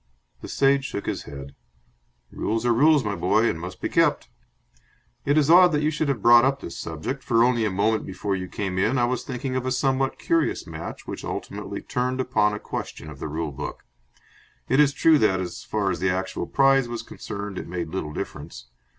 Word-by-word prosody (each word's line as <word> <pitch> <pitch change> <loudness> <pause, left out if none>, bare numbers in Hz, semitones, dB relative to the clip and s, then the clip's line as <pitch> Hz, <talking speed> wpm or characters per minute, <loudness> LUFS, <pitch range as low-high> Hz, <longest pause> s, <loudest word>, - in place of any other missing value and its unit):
The - - -7
Sage 135 0 +2
shook 100 - -5
his - - -3
head. 70 -1 -9 0.8
"Rules 115 +2 -2
are 120 - +4
rules, 145 +3 +4
my 105 -2 -2
boy, 110 +6 +2
and 80 - -2
must 90 +2 -7
be - - -2
kept. - - +2 1.0
It 145 +2 +2
is 150 -2 +4
odd 175 +2 +7
that 150 0 +1
you 155 - +2
should 155 0 -1
have 125 -7 -2
brought 120 0 +8
up 135 +1 +2
this 85 - -8
subject, 80 - -5
for 115 0 +3
only 120 -2 +2
a - - +1
moment 105 +3 +1
before 95 +1 -3
you 90 -1 -4
came 95 -1 -3
in 115 +7 +2
I 120 - +3
was 125 +1 -2
thinking 130 0 -4
of 130 - -1
a 130 - -2
somewhat 135 +1 0
curious 335 -1 0
match - - -8
which - - -6
ultimately - - -5
turned 125 0 -2
upon 125 -5 +2
a 105 - -4
question 75 -6 -6
of 70 - -11
the - - -4
rule 80 0 -3
book. 65 - -7 0.8
It 135 - +2
is 145 -2 +5
true 155 +2 +4
that, 95 -5 +3
as 90 -1 -5
far 100 -3 -1
as 90 - -3
the 95 - +1
actual 95 +1 -2
prize 135 -2 +3
was 120 -1 -4
concerned, 100 -2 -6
it - - -7
made 85 -2 -4
little 80 -4 -4
difference. - - -7
115 Hz, 210 wpm, -24 LUFS, 95-135 Hz, 1.0 s, brought